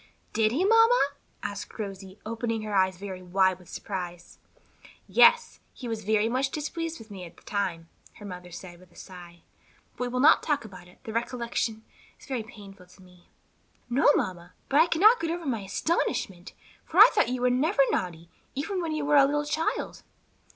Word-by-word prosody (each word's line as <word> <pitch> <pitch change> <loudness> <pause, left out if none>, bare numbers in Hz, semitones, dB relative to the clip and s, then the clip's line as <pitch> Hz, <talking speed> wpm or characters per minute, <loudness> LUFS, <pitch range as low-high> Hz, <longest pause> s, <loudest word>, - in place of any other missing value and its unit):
"Did 220 -1 +2
he, 320 +10 +1
mamma?" 455 - +5 0.3
asked 200 -1 -6
Rosie, 195 -2 -7
opening 230 0 -3
her 215 -1 -5
eyes 190 -1 +2
very 190 -1 -7
wide 185 0 +1
with 180 - -17
surprise. 175 -3 -7 0.7
"Yes, 475 0 +4 0.2
he 250 - -7
was 225 -2 -4
very 215 +1 +2
much 260 +3 0
displeased 325 +3 -4
with 220 -1 -14
me 190 -2 -8
at 170 - -12
the - - -20
time," 180 -5 -3 0.3
her 205 - -12
mother 180 -2 -8
said 175 0 -10
with 180 -1 -19
a - - -24
sigh. 175 -2 -12 0.5
"But - - -8
we 250 - 0
will 250 +1 -2
not 285 - +6
talk 290 -6 -1
about 185 -4 -12
it; 180 - -19
the 220 - -7
recollection 230 -1 -2 0.4
is - - -15
very 260 -4 -3
painful 200 -4 -13
to 185 +1 -19
me." 180 -1 -21 0.6
"No, 270 +4 +5
mamma; 175 -1 -3 0.2
but 285 +3 +5
I 330 - +4
cannot 420 +9 +5
get 330 - -2
over 340 0 -4
my 245 -6 -1
astonishment, 195 - -2 0.3
for 330 - -7
I 425 +4 +11
thought 425 - +2
you 250 0 -3
were 250 - +4
never 275 +4 +3
naughty, 170 -2 -3 0.3
even 360 +7 -2
when 325 -2 -2
you 305 -2 -2
were 295 0 +4
a 275 - +7
little 295 +1 0
child." 315 +2 -2
220 Hz, 195 wpm, -27 LUFS, 185-290 Hz, 0.7 s, I